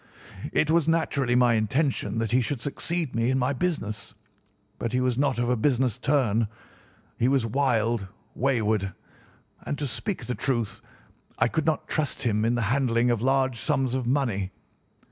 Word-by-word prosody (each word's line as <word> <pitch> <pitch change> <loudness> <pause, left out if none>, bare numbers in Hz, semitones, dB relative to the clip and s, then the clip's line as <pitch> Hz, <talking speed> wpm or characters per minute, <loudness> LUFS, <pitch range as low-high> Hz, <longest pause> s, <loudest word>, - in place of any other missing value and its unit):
"It 155 - +2
was 165 -2 +3
naturally 140 -6 +1
my 125 -1 +5
intention 115 -1 0
that 115 -2 -1
he 125 +2 +4
should 130 +2 -2
succeed 155 +4 -3
me 115 +1 +1
in 130 - +2
my 130 +2 +1
business, 135 -8 -3 0.6
but 115 - -3
he 125 - +2
was 125 -1 +1
not 140 0 +1
of 120 0 0
a 125 - +2
business 125 -1 +1
turn. 125 -6 +2 0.7
He 120 - +3
was 135 -3 +2
wild, 115 -4 +1 0.3
wayward, 110 -7 0 0.7
and, 145 - -4
to 150 - -2
speak 120 - -4
the 125 - -2
truth, 120 -7 -1 0.6
I 115 - +3
could 160 +5 -1
not 155 -2 0
trust 145 -3 -1
him 110 -3 +1
in 120 +1 +2
the 120 - 0
handling 120 0 +2
of 115 -3 0
large 130 -1 +1
sums 135 -5 0
of 130 -2 -1
money. 120 -8 0
125 Hz, 170 wpm, -26 LUFS, 115-140 Hz, 0.7 s, my